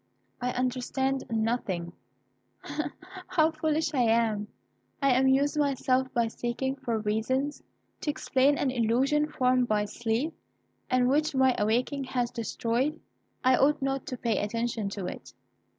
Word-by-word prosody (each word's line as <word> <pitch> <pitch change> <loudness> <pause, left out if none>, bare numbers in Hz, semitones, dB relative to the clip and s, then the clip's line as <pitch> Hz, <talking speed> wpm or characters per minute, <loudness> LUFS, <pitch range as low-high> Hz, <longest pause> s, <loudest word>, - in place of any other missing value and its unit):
I 250 0 0
understand 260 +2 -1
nothing; 220 -7 -1 0.7
but 305 0 -3 0.4
how 315 -1 +3
foolish 315 0 0
I 260 - +2
am! 225 -3 +2 0.5
I 275 -2 +3
amuse 265 +3 +3
myself 265 -3 +1
by 235 -1 +2
seeking 240 +4 -2
for 235 -4 -2
reasons 225 +7 -1 0.4
to - - -3
explain 285 -1 +2
an 270 - +1
illusion 260 +5 +2
formed 255 -3 +2
by 210 -1 +1
sleep, 235 +8 -2 0.6
and 250 -1 +3
which 295 +2 +2
my 260 -1 +4
waking 255 +6 0
has 245 -2 -1
destroyed. 240 +5 -1 0.4
I 255 0 +5
ought 295 +4 +3
not 270 0 -2
to 255 - -4
pay 230 -3 0
attention 225 0 -2
to 200 -2 -5
it. - - -8
255 Hz, 135 wpm, -28 LUFS, 230-275 Hz, 0.7 s, I